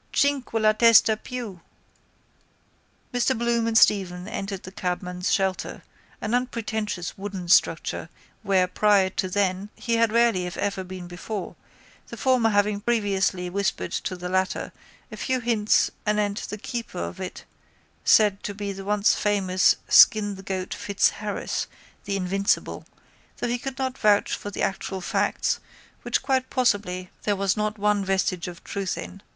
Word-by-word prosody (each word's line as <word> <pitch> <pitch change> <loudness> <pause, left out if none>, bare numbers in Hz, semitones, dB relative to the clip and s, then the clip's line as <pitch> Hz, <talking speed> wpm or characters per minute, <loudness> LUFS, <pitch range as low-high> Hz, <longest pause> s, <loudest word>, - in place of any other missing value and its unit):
Cinque 285 -4 +1
la 215 -1 +4
testa 225 0 +6
più..._ 225 -4 -7 1.5
Mr 245 +1 +1
Bloom 235 0 +1
and 225 -1 +2
Stephen 185 -4 +3
entered 195 -2 -5
the 185 - -9
cabman's 180 -1 -3
shelter, 190 -2 -1 0.4
an 210 - -2
unpretentious 220 -7 -2
wooden 195 -3 -5
structure, 180 - +2 0.3
where, 195 -3 +3
prior 200 0 +3
to 185 -1 -2
then, 195 +1 0
he 230 -1 -1
had 230 -1 +3
rarely 230 -6 +3
if 180 - -7
ever 195 -2 -2
been 185 -1 -8
before, 180 +3 -6 0.5
the - - -9
former 255 -4 +3
having 205 0 +1
previously 200 -5 0
whispered 200 +2 -2
to 185 - -3
the 180 0 -6
latter 185 +1 -1 0.4
a - - -8
few 260 -1 -1
hints 225 -3 +2 0.2
anent 210 -1 0
the 210 - -5
keeper 230 -3 -6
of 180 - -4
it 185 -1 -7 0.6
said 210 -2 +4
to 205 - -5
be 200 0 -4
the 195 0 -8
once 205 +1 +3
famous 190 -3 +2
Skin 205 -2 +6
the 190 - -9
Goat 190 -1 -4
Fitzharris, 205 -1 -1 0.4
the 200 -1 -1
invincible, 195 +1 -1 0.5
though - - -2
he 240 +1 -1
could 270 +1 -6
not 260 -1 -3
vouch 205 -1 +3
for 205 - -7
the 205 - -4
actual 195 0 -2
facts 180 - 0 0.4
which - - -1
quite 260 -1 0
possibly 200 -7 0
there 205 - 0
was 195 -1 +1
not 215 0 -1
one 205 0 +1
vestige 190 -2 0
of 175 -1 -9
truth 195 -2 -3
in. 195 +1 -8
205 Hz, 155 wpm, -25 LUFS, 190-225 Hz, 1.5 s, testa